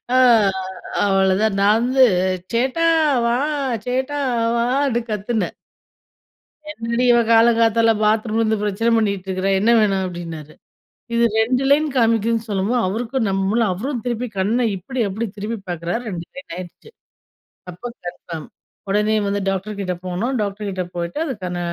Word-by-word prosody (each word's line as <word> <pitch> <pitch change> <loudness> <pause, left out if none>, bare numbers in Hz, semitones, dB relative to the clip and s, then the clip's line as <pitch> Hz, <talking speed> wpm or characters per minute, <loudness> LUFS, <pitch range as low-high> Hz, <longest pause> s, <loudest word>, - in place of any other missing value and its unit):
அ - - +5 0.9
அவ்ளோதான். 195 +1 +2
நான் 210 +2 +5
வந்து, 260 +1 +5 0.5
சேட்டா 265 +8 +1 0.4
வா! 240 +1 +2 0.5
சேட்டா 260 +3 -1 0.4
வான்னு 245 +1 +1
கத்துனேன். 210 +2 -2 1.2
"என்னடி 235 -1 -2
இவ! 240 - +5
காலங்காத்தால 230 0 +4
பாத்ரூம்ல 215 +1 +1
இருந்து 220 -1 +1
பிரச்சனை 210 +3 0
பண்ணிட்டு 200 -3 -1
இருக்கற. 190 +1 -1
என்ன 225 +4 +3
வேணும்?" 195 -3 +2
அப்படின்னாரு. 165 -4 -7 0.6
இது 235 - +3 0.2
2 250 +4 +1
லைன் 305 +2 +4
காமிக்குதுன்னு 230 -1 +1
சொல்லும்போது, 200 +4 0
அவருக்கும் 225 +3 -1
நம்முல. 195 +4 +1
அவரும் 240 +6 -4
திருப்பி 245 0 -2
கண்ண 210 +6 +1 0.2
இப்படி, 250 +8 -6
அப்படி 210 +4 -3
திருப்பி 215 +3 -4
பார்க்குறாரு, 175 +5 -3
2 170 -3 -5
லைன் 275 -7 -10
ஆயிடுச்சு. 185 - -10 0.8
அப்போ 180 +7 -9 0.2
கன்ஃபார்ம். 170 -3 -7 0.4
உடனே 210 +2 +2
வந்து 200 0 -1
டாக்டர் 195 +2 -4
கிட்ட 185 -2 -2
போனோம். 185 +9 -2
டாக்டர் 205 0 -3
கிட்ட 185 -1 -3
போயிட்டு 170 - -4
அதுக்கான 185 - -4
215 Hz, 135 wpm, -20 LUFS, 190-235 Hz, 1.2 s, அ